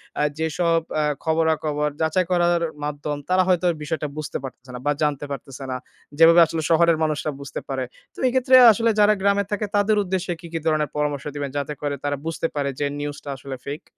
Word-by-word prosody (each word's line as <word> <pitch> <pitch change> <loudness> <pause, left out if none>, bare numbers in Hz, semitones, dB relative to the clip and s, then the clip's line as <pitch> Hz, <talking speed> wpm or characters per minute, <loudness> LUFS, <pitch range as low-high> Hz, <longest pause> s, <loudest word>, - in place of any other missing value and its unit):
অ্যা 150 - +1
যেসব 165 +1 +1 0.2
অ্যা 155 - +2 0.2
খবরাখবর 160 -2 +1
যাচাই 160 +3 +2
করার 175 -1 +3 0.2
মাধ্যম 145 0 -3
তারা 185 0 +4
হয়তো 180 -1 +2 0.2
বিষয়টা 150 0 -2
বুঝতে 150 -1 -4
পারতেছে 130 -1 -9
না - - -6
বা 145 - +3
জানতে 145 -1 0
পারতেছে 135 -1 -7
না। 130 - -2 0.4
যেভাবে 165 +2 +7
আসলে 160 0 -3
শহরের 170 0 +4
মানুষরা 155 0 -1
বুঝতে 140 - -6
পারে। 135 -1 -2 0.3
তো - - -28
এই - - +1
ক্ষেত্রে 260 0 +4 0.2
আসলে 230 +2 +1
যারা 210 0 +6
গ্রামে 200 +1 +3
থাকে 205 +1 -1
তাদের 205 +1 +3
উদ্দেশ্যে 185 -1 -2
কি, 170 - -10
কি 165 - -1
ধরণের 155 -2 +1
পরামর্শ 150 -2 -1
দিবেন 145 -1 -3
যাতে 145 +1 -2
করে 145 -1 -1
তারা 145 0 -1
বুঝতে 165 0 -1
পারে 140 -1 0
যে 145 - +1
নিউজ 145 0 -4
টা 145 - -7
আসলে 135 0 -7
ফেইক? 145 +3 -5
155 Hz, 200 wpm, -23 LUFS, 145-175 Hz, 0.4 s, যেভাবে